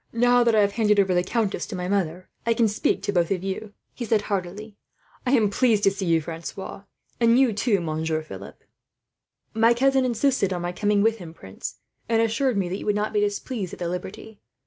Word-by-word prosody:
"Now 245 +1 +4
that 235 -2 +3
I 215 - +5
have 200 0 +2
handed 210 -1 +2
over 190 -2 +3
the 180 - +3
countess 215 +1 -1
to 210 - -6
my 180 0 -3
mother, 185 -2 -1 0.2
I 230 0 +1
can 230 -1 +3
speak 210 - 0
to 205 - 0
you - - -9
both," 175 -3 +2 0.6
he 245 - -6
said 220 -2 +1
heartily. 200 +2 -4 0.5
"I 250 - +2
am 215 -6 +3
pleased 220 -2 +2
to 195 - +5
see 195 -1 -4
you, 165 -1 +3
Francois, 170 +5 -7 0.3
and 235 0 +4
you 260 -4 +4
too, 205 0 +1
Monsieur 160 -1 -2
Philip." 100 -9 -11 0.9
"My 230 +2 +4
cousin 270 +1 +3
insisted 245 -4 +1
on 175 -1 -4
my 175 - -2
coming 205 +2 +1
with 225 0 +2
him, 165 -3 -10
prince, 95 -8 -8 0.3
and 225 -1 +3
assured 230 +2 +1
me 190 -3 0
that 190 - -3
you - - -8
would 210 - +2
not 210 +1 -1
be 210 - +2
displeased 205 -1 -2
at - - -7
the 175 - -2
liberty. 190 +4 -7
205 Hz, 215 wpm, -24 LUFS, 180-230 Hz, 0.9 s, I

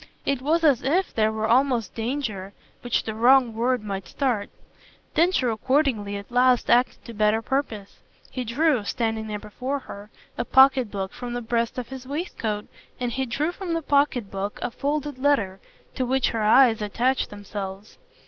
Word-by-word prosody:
It 275 -2 0
was 325 +5 +1
as 285 -7 +4
if 345 +8 0
there 220 -1 +2
were 220 0 -2
almost 245 -1 +2
danger, 225 -5 -3 0.3
which 245 -1 0
the 220 - -4
wrong 245 +1 +4
word 240 +1 0
might 195 -2 -5
start. 245 -8 -1 0.6
Densher 330 -7 +2
accordingly 225 -4 0
at 200 +3 -10
last 250 0 +3
acted 245 +1 +2
to 235 - -8
better 215 +1 +2
purpose: 225 -8 -3 0.3
he 255 - -3
drew, 255 +1 +1
standing 225 +1 -2
there 210 -1 -3
before 250 +7 -4
her, 205 -6 -10 0.3
a - - +1
pocket 265 -2 +5
book 195 -1 -4
from 245 -1 -6
the 245 - -2
breast 230 +1 -1
of 250 -2 -5
his 265 -1 -8
waistcoat 250 - -3 0.3
and 245 -1 -2
he 265 +2 -2
drew 290 +8 -1
from 360 -2 -5
the 330 - -2
pocket 280 -8 +1
book 200 +1 -4
a - - -2
folded 290 0 -3
letter 225 -9 +1 0.3
to 260 - -2
which 260 +1 +1
her 225 - -2
eyes 225 +1 +5
attached 240 +6 0
themselves. 200 0 -8
240 Hz, 175 wpm, -24 LUFS, 215-270 Hz, 0.6 s, pocket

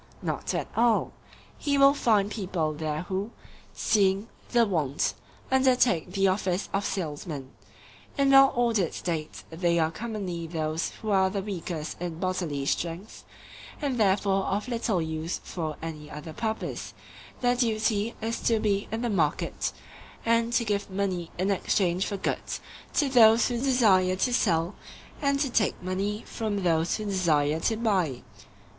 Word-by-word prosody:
Not - - -2
at - - -2
all; 235 -1 +2 0.5
he 285 -1 +1
will 275 0 +7
find 215 -7 +2
people 180 -7 -2
there 155 +1 -3
who, 190 +3 -3 0.4
seeing 200 0 +1 0.2
the 235 -1 +4
want, 155 -8 0 0.4
undertake 250 -10 +3
the 195 -1 +3
office 185 0 0
of 195 +1 +1
salesmen. 150 -6 -4 0.7
In 275 -1 +3
well 270 0 +8
ordered 230 -8 +1
states 160 -3 -4
they 170 +1 +1
are 160 -1 +2
commonly 185 -4 -4
those 160 0 -2
who 215 - -5
are 190 -1 +4
the 195 0 -3
weakest 175 -6 -5
in 175 -2 -4
bodily 175 -6 -2
strength, 170 +7 -3 0.6
and 275 -5 -1
therefore 195 -1 +2
of 205 +4 -1
little 230 -7 0
use 160 +1 -3
for 155 -4 -4
any 155 -2 -6
other 150 +2 -8
purpose; 220 +2 -4 0.5
their 245 0 +3
duty 220 -2 0
is 225 +1 -2
to 230 -2 +2
be 200 -2 0
in 225 +2 -2
the 240 - 0
market, 160 -7 0 0.5
and 230 0 +2
to 235 0 +2
give 205 -2 -1
money 190 -3 -2
in 190 +3 +1
exchange 185 -1 +1
for 200 - -3
goods - - -3 0.4
to 290 - +3
those 230 -3 +6
who 240 -1 -1
desire 215 -9 +4
to 245 +6 0
sell 165 -4 +2 0.5
and 280 -1 +2
to 275 -3 0
take 215 -3 +1
money 195 +4 -2
from 210 -4 -3
those 165 -1 +2
who 215 - -5
desire 160 -6 +1
to 220 +6 0
buy. 185 - 0
195 Hz, 150 wpm, -27 LUFS, 170-225 Hz, 0.7 s, well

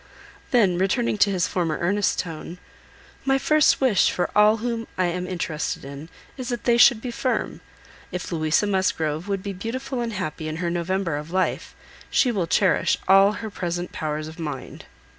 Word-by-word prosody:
Then 195 -8 +3
returning 210 +3 +1
to 205 - +5
his 185 -3 +1
former 165 -4 -1
earnest 200 +4 +1
tone—"My 180 - -5
first 305 +2 +3
wish 255 -7 +4
for 175 - -1
all 210 +1 +5
whom 230 0 -3
I 185 - +2
am 180 +1 -2
interested 165 -6 -3
in, 140 +3 -9 0.3
is 255 -1 -5
that 240 -3 -3
they 235 -1 +3
should 240 -2 +6
be 250 - -4
firm. 255 +2 -2 0.5
If 180 0 -5
Louisa 160 +3 +1
Musgrove 175 -4 0
would 195 -2 -2
be 200 - -4
beautiful 240 +6 -4
and 230 -1 -3
happy 160 -5 -4
in 155 - -4
her 170 +1 -2
November 175 -2 -1
of 150 +2 -7
life, 185 +1 -1 0.3
she 255 - +3
will 190 -7 -1
cherish 190 +3 +2
all 195 +2 +6
her 220 0 -6
present 175 -3 -3
powers 155 0 -3
of 160 +2 -11
mind." 150 -5 -6
185 Hz, 175 wpm, -24 LUFS, 170-225 Hz, 0.5 s, should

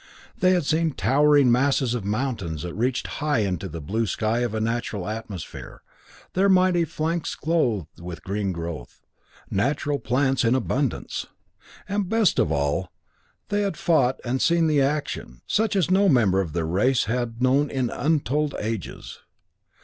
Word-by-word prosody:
They 185 0 +4
had 175 -5 +1
seen 160 +1 +1
towering 140 +6 +4
masses 130 0 +2
of 120 -4 -2
mountains 105 - -2
that 90 - -5
reached 120 +5 -1 0.2
high 145 -6 +1
into 95 -1 -2
the 85 +1 -6
blue 110 +9 -2
sky 110 +4 0
of 120 -3 -1
a - - 0
natural 110 -4 -2
atmosphere, 105 -5 -7 0.5
their 195 +2 +3
mighty 185 -2 +4
flanks 160 +2 -2
clothed 120 - -1
with 85 -1 -8
green 100 0 -2
growth; 85 -7 -7 0.5
natural 140 +7 0
plants 135 +1 +1
in 115 +2 +3
abundance. 130 +1 -2 0.6
And 200 -2 -1
best 225 -6 +3
of 75 - +2
all, 70 +5 -1 0.6
they 205 0 +1
had 195 -6 -2
fought 135 -7 +2
and 130 +2 -1
seen 170 -1 +3
action, 135 - -2
such 220 -1 +1
as 185 -2 +1
no 195 +1 +4
member 100 -8 +3
of 85 -6 -5
their 85 -2 -1
race 105 +10 +2
had 115 0 -2
known 135 +3 +3
in 130 -3 -1
untold 150 -1 0
ages. 110 -3 -5
125 Hz, 155 wpm, -24 LUFS, 100-150 Hz, 0.6 s, They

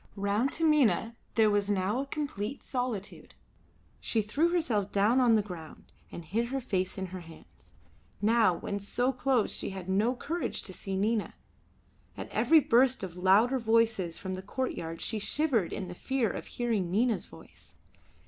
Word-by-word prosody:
Round 205 +6 0
Taminah 295 -8 +2 0.2
there 220 -2 +4
was 205 0 +1
now 200 +4 0
a 275 - -2
complete 275 -5 -4
solitude. 245 -6 -4 0.6
She 220 -2 0
threw 290 +11 +1
herself 240 - 0
down 210 +6 +3
on 240 -3 +5
the 215 - +2
ground, 175 -6 -10 0.2
and 170 - -8
hid 230 +8 -1
her 270 +2 -2
face 185 -7 -2
in 190 - -3
her 185 - -5
hands. 120 - -15 0.5
Now 220 0 +4
when 200 +3 -4
so 245 +6 0
close 250 -3 +1
she - - -3
had 190 -2 -7
no 210 +7 +1
courage 335 +7 -3
to 190 - -8
see 190 +1 -4
Nina. 215 +2 0 0.8
At - - -6
every 320 -1 +4
burst 260 -3 +3
of 180 -2 -6
louder 205 +8 +4
voices 225 -6 +1
from 190 -1 -5
the 185 - -5
courtyard 180 -6 -4
she 220 - -1
shivered 235 - +1
in 190 - -4
the 175 - -7
fear 250 +3 -1
of - - -7
hearing 225 -7 -1
Nina's 215 0 +1
voice. 80 - -15
215 Hz, 165 wpm, -29 LUFS, 190-250 Hz, 0.8 s, on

